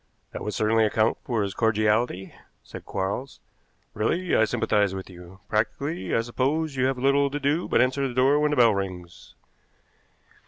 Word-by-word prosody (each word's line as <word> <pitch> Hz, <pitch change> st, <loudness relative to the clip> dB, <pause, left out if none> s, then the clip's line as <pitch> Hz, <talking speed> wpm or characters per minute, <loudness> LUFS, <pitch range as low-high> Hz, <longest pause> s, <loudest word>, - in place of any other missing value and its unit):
"That -, -, -7 dB
would 105 Hz, -, -4 dB
certainly 110 Hz, +1 st, +2 dB
account 110 Hz, +1 st, +1 dB
for 115 Hz, -4 st, -1 dB
his 100 Hz, -1 st, -3 dB
cordiality," 110 Hz, -2 st, 0 dB, 0.3 s
said -, -, -11 dB
Quarles. 100 Hz, +8 st, -4 dB, 0.5 s
"Really, 170 Hz, +12 st, 0 dB
I 110 Hz, -, +4 dB
sympathize 105 Hz, -2 st, 0 dB
with 95 Hz, 0 st, -8 dB
you. 90 Hz, +2 st, -14 dB
Practically, 140 Hz, +9 st, -2 dB
I 115 Hz, -, +2 dB
suppose, 135 Hz, +6 st, -1 dB
you 130 Hz, -1 st, +1 dB
have 135 Hz, -1 st, -1 dB
little 140 Hz, +2 st, +2 dB
to 145 Hz, +1 st, -4 dB
do 150 Hz, +5 st, 0 dB
but -, -, +3 dB
answer 135 Hz, +2 st, 0 dB
the 125 Hz, -, -7 dB
door 135 Hz, +3 st, +4 dB
when 150 Hz, 0 st, +2 dB
the 150 Hz, -, -1 dB
bell 115 Hz, -3 st, +5 dB
rings." 90 Hz, -3 st, -6 dB
115 Hz, 170 wpm, -25 LUFS, 105-140 Hz, 0.5 s, bell